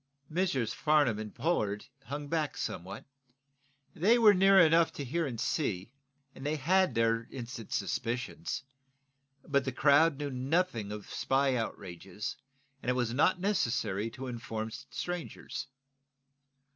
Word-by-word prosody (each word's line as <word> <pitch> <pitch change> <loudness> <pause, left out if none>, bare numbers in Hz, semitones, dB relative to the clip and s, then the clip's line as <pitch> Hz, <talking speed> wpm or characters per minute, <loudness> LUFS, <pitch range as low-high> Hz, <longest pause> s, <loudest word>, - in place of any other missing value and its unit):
Messrs. 155 - 0
Farnum 145 -8 +3
and 110 -1 -5
Pollard 110 -9 0 0.2
hung 145 +1 -5
back 155 -1 -1
somewhat. 95 +5 -5 0.9
They 215 +9 +4
were 220 -3 +7
near 195 +1 +6
enough 165 -1 +5
to 145 - -5
hear 165 +5 -1
and 120 -4 -5
see, 115 - -1 0.4
and 135 - -11
they 150 +2 0
had 185 +6 +2
their 115 0 +2
instant 120 -3 -7
suspicions. 125 +9 -2 0.8
But 140 -1 +2
the 135 - -2
crowd 145 +4 +4
knew 145 -1 -3
nothing 130 - 0
of 105 -1 -6
the - - -13
spy 135 0 +2
outrages, 100 -3 -5 0.5
and - - -3
it - - +3
was 120 -2 0
not 170 +8 +3
necessary 115 - 0
to 130 +3 -8
inform 115 -2 -4
strangers. 175 +8 -5
135 Hz, 135 wpm, -31 LUFS, 115-165 Hz, 0.9 s, were